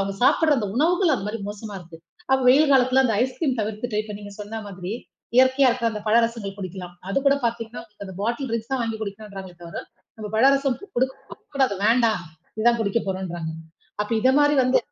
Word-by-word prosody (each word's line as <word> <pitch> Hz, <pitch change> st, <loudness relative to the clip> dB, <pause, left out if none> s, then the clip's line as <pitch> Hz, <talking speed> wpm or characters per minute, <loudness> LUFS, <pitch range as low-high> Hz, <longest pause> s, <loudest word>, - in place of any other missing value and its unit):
அவங்க 195 Hz, 0 st, -1 dB
சாப்பிடற, 310 Hz, -3 st, +4 dB
அந்த 205 Hz, -, -2 dB
உணவுகள் 340 Hz, +1 st, +3 dB
அந்த 195 Hz, -, -6 dB
மாரி 225 Hz, 0 st, -4 dB
மோசமா 210 Hz, 0 st, -8 dB
இருக்கு. 165 Hz, -1 st, -13 dB, 0.3 s
அப்ப 265 Hz, 0 st, +4 dB
வெயில் 285 Hz, +3 st, +6 dB
காலத்துல 260 Hz, 0 st, +5 dB
அந்த 230 Hz, -, +2 dB
ஐஸ் 255 Hz, +1 st, 0 dB
கிரீம் 265 Hz, -7 st, 0 dB
தவிர்த்துட்டு. 215 Hz, +1 st, -3 dB
இப்ப 210 Hz, -1 st, -7 dB
நீங்கச் 205 Hz, 0 st, -10 dB
சொன்ன 220 Hz, +2 st, -6 dB
மாதிரி 185 Hz, -1 st, -7 dB, 0.5 s
இயற்கயா 260 Hz, +1 st, +5 dB
இருக்குற 235 Hz, -1 st, 0 dB
அந்தப் 210 Hz, -1 st, -6 dB
பழரசங்கள் 230 Hz, -3 st, +1 dB
குடிக்கலாம். 185 Hz, -1 st, -7 dB, 0.2 s
அதுகூட 275 Hz, +6 st, +3 dB
பாத்தீங்கன்னா, 230 Hz, 0 st, -3 dB
உங்களுக்கு 210 Hz, -3 st, -12 dB
அந்த 190 Hz, -, -8 dB
பாட்டில் 235 Hz, +6 st, -1 dB
ட்ரிங்க்ஸ் 230 Hz, +2 st, -3 dB
தான் 265 Hz, -2 st, 0 dB
வாங்கி 225 Hz, -1 st, -2 dB
குடிக்கனுன்றாங்க 200 Hz, -2 st, -7 dB
தவிர. 170 Hz, -, -6 dB, 0.4 s
நம்ம 215 Hz, -1 st, -6 dB
பழரசம் 275 Hz, +2 st, +4 dB, 0.2 s
குடுக்கக் 260 Hz, +2 st, -3 dB
கூடாது, 265 Hz, -7 st, +2 dB
வேண்டாம். 225 Hz, -3 st, +3 dB, 0.4 s
இதான் 235 Hz, +1 st, +3 dB
குடிக்கப்போறோன்றாங்க. 190 Hz, -6 st, -2 dB, 0.5 s
அப்ப 210 Hz, -, -2 dB
இத 255 Hz, -, +4 dB
மாரி 290 Hz, 0 st, +4 dB
வந்து 255 Hz, +1 st, +3 dB
225 Hz, 180 wpm, -24 LUFS, 200-260 Hz, 0.5 s, வெயில்